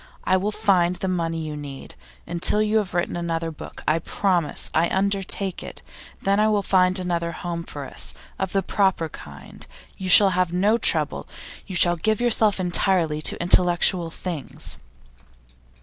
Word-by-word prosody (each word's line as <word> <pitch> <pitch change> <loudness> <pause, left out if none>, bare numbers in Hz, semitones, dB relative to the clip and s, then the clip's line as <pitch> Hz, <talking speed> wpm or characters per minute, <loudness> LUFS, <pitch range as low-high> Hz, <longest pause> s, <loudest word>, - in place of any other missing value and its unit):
I 185 - +2
will 195 +3 0
find 185 -5 +2
the 190 - -4
money 165 -3 -2
you 155 -1 -5
need, 140 -2 -9 0.3
until 175 +4 +2
you 215 +1 +2
have 200 -5 -2
written 175 - -1
another 165 -1 -2
book. 155 - -10
I 155 +2 +2
promise; 175 -3 -1
I 165 +2 +2
undertake 195 -1 -1
it. - - -8 0.4
Then 200 +1 +2
I 215 - +4
will 210 -2 +1
find 185 -1 +3
another 170 -2 -1
home 170 -1 -5
for 145 -4 -7
us, - - -5 0.2
of 190 -1 -2
the 195 -1 0
proper 190 -4 0
kind. 70 - -11 0.3
You 190 -1 -3
shall 195 +1 +8
have 180 -1 0
no 205 +6 +2
trouble. - - +1 0.4
You 190 - -6
shall 175 0 +4
give 215 +5 0
yourself 220 -4 +2
entirely 175 -3 +1
to - - +1
intellectual 175 0 +2
things. 165 -3 -5
180 Hz, 165 wpm, -23 LUFS, 170-195 Hz, 0.4 s, shall